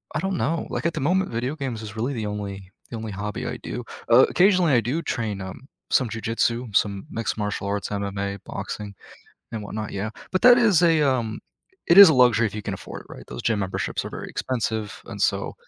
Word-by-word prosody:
I - - +1
don't 190 +1 -1
know. 165 +3 -1
Like, - - -4
at 170 - +1
the - - -2
moment, 185 +6 +1
video 125 +5 -2
games 130 -7 -4
is 105 -1 -8
really 120 +6 -2
the 110 -4 -3
only 100 -2 -6 0.2
the 115 - -4
only 110 -1 -5
hobby 105 +1 -4
I - - -4
do. 125 - -5 0.3
Uh, 125 +3 +8
occasionally 180 -4 +4
I 120 - +5
do 130 +9 -2
train, 110 -9 -3
um, 95 +8 -8 0.2
some 125 -3 +3
jujitsu, 115 0 -1
some 100 -2 +1
mixed 115 -1 -2
martial 105 -1 -3
arts, 100 -2 -2
MMA, 100 0 -3
boxing, 105 -1 -6 0.6
and 110 -2 -4
whatnot, 105 +1 -5
yeah, 100 +2 -3 0.2
but 185 - 0
that 245 +1 +8
is 210 -8 +4
a, 165 -3 +4
um 120 -6 0 0.5
it 170 - +6
is 200 -4 +12
a - - +3
luxury 120 -2 +5
if 105 - -6
you 105 - -3
can - - -3
afford - - -8
it, - - -23
right? - - -10
Those 60 - -6
gym 110 -3 +1
memberships 95 -1 -2
are - - -6
very - - -7
expensive, 110 -4 -3
and - - -8
so - - 0
115 Hz, 220 wpm, -24 LUFS, 105-140 Hz, 0.6 s, is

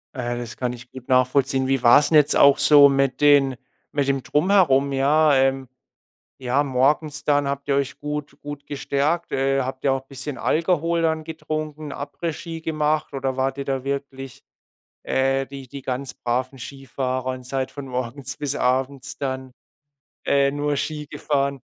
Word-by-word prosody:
Äh, 120 -1 -3
das 120 -2 -7
kann 125 -1 -2
ich 125 +1 -12
gut 130 -1 -11
nachvollziehen. 130 +1 +2
Wie 135 -2 0
war's 145 +6 +6
'n - - +4
jetzt 150 -1 +5
auch 140 -1 +6
so 145 -2 +7
mit 135 0 0
den 140 -3 +5 0.4
mit 145 -2 0
dem 135 -1 0
Drumherum? 150 -5 +3
Ja, 150 +3 +3
ähm 135 0 +1 0.7
ja 130 +3 +1
morgens 145 +3 0
dann 145 -1 +2
habt 140 0 -4
ihr 140 - +2
euch 140 0 -1
gut 150 -1 -5
gut 145 -1 -8
gestärkt? 145 +4 -1
Äh, 135 0 +1
habt 130 +1 -5
ihr 135 - +3
auch 135 0 -3
bisschen 135 +1 -7
Alkohol 170 0 +1
dann 160 -1 0
getrunken, 155 -2 -5
Après-Ski 165 +3 -5
gemacht 155 -1 -1
oder 135 -1 -2
wart 135 +1 -1
ihr 140 - -3
da 135 -1 -2
wirklich, 135 -2 -5 0.6
äh, 135 0 0
die 135 -1 -9
die 140 +2 -8
ganz 130 +1 -4
braven 130 +2 -2
Skifahrer 130 -1 -4
und 130 -1 -9
seid 130 0 -2
von 140 -2 -8
morgens 130 +2 -4
bis 145 -2 -3
abends 130 +1 -1
dann, 130 -2 -4 0.7
äh, 140 0 +3
nur 145 0 -1
Ski 150 +1 -3
gefahren? 140 -2 -1
140 Hz, 165 wpm, -23 LUFS, 130-145 Hz, 0.7 s, so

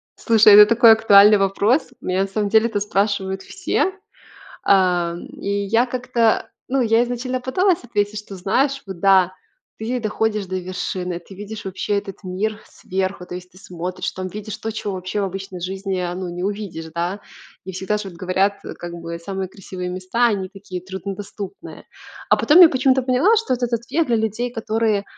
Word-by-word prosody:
Слушай, 220 -2 +5
это 210 +1 +11
такой 230 +1 +6
актуальный 210 -1 +7
вопрос. 200 +7 +1
Меня, 185 +1 0
на - - -3
самом 205 +1 -2
деле, 220 +2 +4
это 205 -3 -2
спрашивают 200 -1 -1
все. 380 - -1 0.7
А, 180 -3 +3
м, 175 - -8
и - - -8 0.2
я 230 +5 +3
как-то, 240 -2 0 0.2
ну, 270 +1 +1
я 225 0 +3
изначально 250 +1 -3
пыталась 360 +8 +1
ответить, 210 -3 -1
что, 200 -2 -9
знаешь, 270 +9 0
вот, 190 -3 -8
да, 190 -2 +4 0.5
ты 245 +3 -2
доходишь 215 -1 -1
до 185 0 -4
вершины, 180 -1 -4
ты 190 +2 -14
видишь 210 +1 -8
вообще 195 +2 -2
этот 195 0 -8
мир 210 +4 -3
сверху, 190 -1 -4
то 180 - -6
есть, 180 0 -11
ты 185 - -16
смотришь, 180 0 -5
там, 185 0 -6
видишь 210 +2 -7
то, 225 - -4
чего 210 -2 -4
вообще 185 +3 -3
в 200 - 0
обычной 190 -1 -6
жизни, 190 +1 -3
а, 175 -1 -3
ну, 185 0 -5
не 175 +1 -5
увидишь, 200 -5 -4
да. 175 +4 -2 0.4
И, 190 - -7
всегда 190 +3 -2
ж, 210 - -6
вот, 190 - -9
говорят, 185 +3 0 0.2
как 175 0 -7
бы, 170 0 -6
самые 190 +1 -4
красивые 185 -2 -7
места, 185 +7 0
они, 195 -5 -1
такие, 190 -2 -8
труднодоступные. 195 +2 -8 0.4
А, - - +5
потом, 315 +5 +5
я 340 - +11
почему-то 265 -1 +2
поняла, 265 - +3
что 420 - +1
этот 245 -1 -3
ответ 240 +8 0
для 235 - +3
людей, 220 +2 -2
которые, 220 -2 0
200 Hz, 185 wpm, -21 LUFS, 185-225 Hz, 0.7 s, это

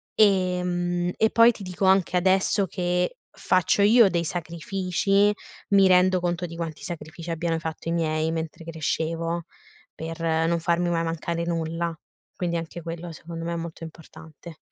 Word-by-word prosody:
Ehm, 180 -3 +2
e 220 - +3
poi 230 +1 +7
ti 220 - -10
dico 185 +1 -5
anche 190 -1 +3
adesso 190 +2 +2
che 180 0 -1 0.2
faccio 185 +2 +2
io 215 +1 +6
dei 170 -2 0
sacrifici, 185 +4 0 0.4
mi 195 -1 +6
rendo 185 0 +5
conto 175 0 -1
di 165 -1 -8
quanti 165 -2 -5
sacrifici 165 0 -7
abbiano 165 0 -1
fatto 160 0 -5
i - - 0
miei 160 -1 0
mentre 165 0 -5
crescevo 165 +1 -2 0.5
per 165 +1 -6
non 165 +1 +1
farmi 170 +1 +1
mai 165 -1 0
mancare 165 +1 -2
nulla. 165 0 -2 0.4
Quindi 175 -2 -2
anche 165 +1 -6
quello 170 +1 -6
secondo 165 +1 -8
me 170 - -2
è - - -2
molto 165 0 -7
importante. 160 0 -12
170 Hz, 155 wpm, -25 LUFS, 165-180 Hz, 0.5 s, poi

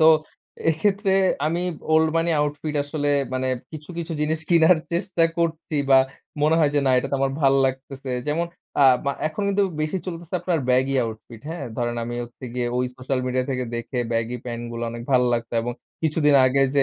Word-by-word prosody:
তো 155 - +7 0.6
এক্ষেত্রে 195 +4 +1 0.3
আমি 170 +3 0 0.3
'ওল্ড 160 0 +5
মনি 165 +1 +2
আউটফিট' 150 +1 -2
আসলে 145 0 -1 0.2
মানে 130 0 -1 0.2
কিছু, 150 +2 -9
কিছু 165 0 -4
জিনিস 155 +1 0
কিনার 170 0 +6 0.2
চেষ্টা 170 -1 +1
করছি 160 -2 -1
বা 135 - +8 0.4
মনে 155 +2 +4
হয় 150 -3 +4
যে, 145 - +4
না 130 - +3
এইটা 135 +2 0
তো - - 0
আমার 135 0 +1
ভাল 135 -1 +4
লাগতেছে। 130 0 -5 0.2
যেমন 165 +3 0 0.4
আ - - +7 0.2
মা 140 - +2 0.2
এখন 200 +6 -5
কিন্তু 200 0 +2 0.2
বেশি 155 +5 -1
চলতেছে 170 -1 -6
আপনার 170 -5 0
ব্যাগি 130 +2 +2
আউটফিট 110 0 -8
হ্যাঁ। 165 -4 -5
ধরেন 120 0 -1
আমি 120 - -4
হচ্ছে 120 +2 -13
গিয়ে 125 -1 -1
ওই 125 0 +1
সোশ্যাল 130 +1 -2
মিডিয়া 130 0 0
থেকে 130 -1 -1
দেখে 120 +2 -4
ব্যাগি 115 +2 -1
প্যান্ট 120 -1 -5
গুলা 115 0 -3
অনেক 120 0 -6
ভাল 125 -2 +5
লাগতো 115 0 -4
এবং 120 +1 -2 0.3
কিছুদিন 150 -2 +3
আগে 135 +2 +3
যে 140 - +6
145 Hz, 195 wpm, -23 LUFS, 125-160 Hz, 0.6 s, বা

